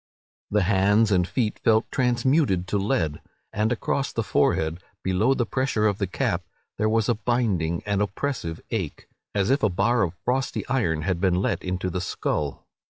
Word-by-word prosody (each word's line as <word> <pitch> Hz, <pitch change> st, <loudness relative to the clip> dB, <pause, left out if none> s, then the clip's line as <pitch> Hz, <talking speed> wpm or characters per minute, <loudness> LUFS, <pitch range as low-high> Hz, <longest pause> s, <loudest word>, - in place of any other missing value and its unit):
The 105 Hz, -1 st, +2 dB
hands 100 Hz, +3 st, +3 dB
and 90 Hz, -2 st, +3 dB
feet 115 Hz, -2 st, -1 dB
felt 110 Hz, 0 st, +2 dB
transmuted 125 Hz, -, +2 dB
to 105 Hz, -, +1 dB
lead; 80 Hz, -7 st, 0 dB, 0.3 s
and 105 Hz, +2 st, +1 dB
across 135 Hz, +3 st, -1 dB
the 115 Hz, -, -1 dB
forehead, 80 Hz, -4 st, +1 dB, 0.2 s
below 100 Hz, +8 st, +2 dB
the 120 Hz, -, 0 dB
pressure 130 Hz, -3 st, 0 dB
of 105 Hz, -2 st, +1 dB
the 100 Hz, -, 0 dB
cap, 90 Hz, -1 st, -1 dB, 0.4 s
there 110 Hz, -, +2 dB
was 110 Hz, -1 st, +2 dB
a 120 Hz, -, +3 dB
binding 105 Hz, -8 st, 0 dB
and 100 Hz, -1 st, 0 dB
oppressive 100 Hz, -5 st, -2 dB
ache, -, -, -3 dB, 0.3 s
as 100 Hz, +3 st, +2 dB
if 140 Hz, -, +2 dB
a 110 Hz, -, +3 dB
bar 115 Hz, +6 st, +2 dB
of 90 Hz, -1 st, 0 dB
frosty 130 Hz, +2 st, -1 dB
iron 85 Hz, -12 st, 0 dB
had 90 Hz, -1 st, -1 dB
been 95 Hz, -2 st, +3 dB
let 90 Hz, -, 0 dB
into 90 Hz, 0 st, -2 dB
the 90 Hz, -, -2 dB
skull. 75 Hz, -5 st, -2 dB
105 Hz, 175 wpm, -25 LUFS, 90-120 Hz, 0.4 s, hands